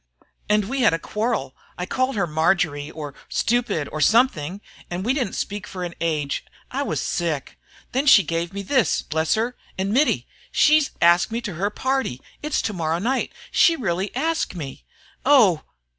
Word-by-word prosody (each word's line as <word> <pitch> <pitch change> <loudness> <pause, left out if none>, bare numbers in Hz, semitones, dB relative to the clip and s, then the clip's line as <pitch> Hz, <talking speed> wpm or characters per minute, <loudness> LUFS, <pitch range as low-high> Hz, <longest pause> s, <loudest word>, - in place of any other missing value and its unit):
And 210 -1 +3
we 270 +3 -1
had 220 -8 +5
a - - -2
quarrel 210 - -2 0.2
I 180 - -3
called 255 +6 0
her 195 -4 +1
Marjory, 160 -2 +1
or 150 -3 -7 0.2
stupid, 235 -11 0
or 155 - -3
something 200 - +3 0.3
we 190 +8 -1
didn't 260 -8 -1
speak 205 +1 -4
for 185 -3 -6
an 175 -1 -4
age 150 -4 -1 0.3
I - - -1
was - - -1
sick. 160 -5 -2 0.3
Then 270 +3 0
she 210 -7 +8
gave 165 +1 -2
me 200 0 -5
this, 260 +4 +2
bless 160 +1 0
her! 235 +3 -1 0.2
And 195 +2 -1
Mittie, 285 +5 +2 0.3
she's 305 -1 +4
asked 175 +4 +5
me 230 - -1
to 210 -5 -5
her 190 +6 -1
party 260 - -1 0.2
it's 300 +1 -1
to 210 - -1
morrow 165 -2 -1
night 245 +9 -1 0.2
she 335 - +5
really 195 - -1
asked 320 - -1
me. 135 - -7 0.4
Oh! 225 - +5
195 Hz, 175 wpm, -23 LUFS, 165-245 Hz, 0.4 s, she